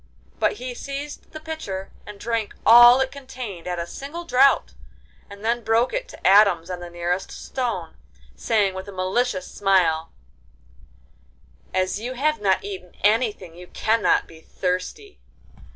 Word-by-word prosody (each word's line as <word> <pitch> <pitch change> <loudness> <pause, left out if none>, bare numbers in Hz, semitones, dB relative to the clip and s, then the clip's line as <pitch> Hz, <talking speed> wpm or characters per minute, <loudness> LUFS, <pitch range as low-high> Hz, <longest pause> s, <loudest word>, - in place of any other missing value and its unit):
But - - +2
he 255 -11 -6
seized 280 +3 -7
the 310 - -8
pitcher 310 -13 -6 0.2
and 210 -1 -10
drank 230 -2 -2
all 240 +2 +9
it 265 - -1
contained 250 -10 -8
at 180 -1 -2
a 170 - -3
single 290 - -8
draught, 270 -2 +3 0.6
and 200 +1 -10
then 235 +1 0
broke 225 +3 +2
it - - -2
to - - -4
atoms 190 -3 +5
on 180 - -4
the 175 0 -8
nearest 175 +2 -2
stone, 225 -11 -4 0.4
saying 200 - +1
with 190 +1 -7
a - - -9
malicious 190 +2 -1
smile: 170 -5 +2 1.6
'As 185 +1 0
you 245 +4 -4
have 305 +3 0
not 190 -2 +2
eaten 190 -3 -8
anything 210 -5 +1
you 180 +1 -12
cannot 225 +4 +1
be 160 -1 -15
thirsty. 185 - -4
210 Hz, 150 wpm, -23 LUFS, 185-255 Hz, 1.6 s, all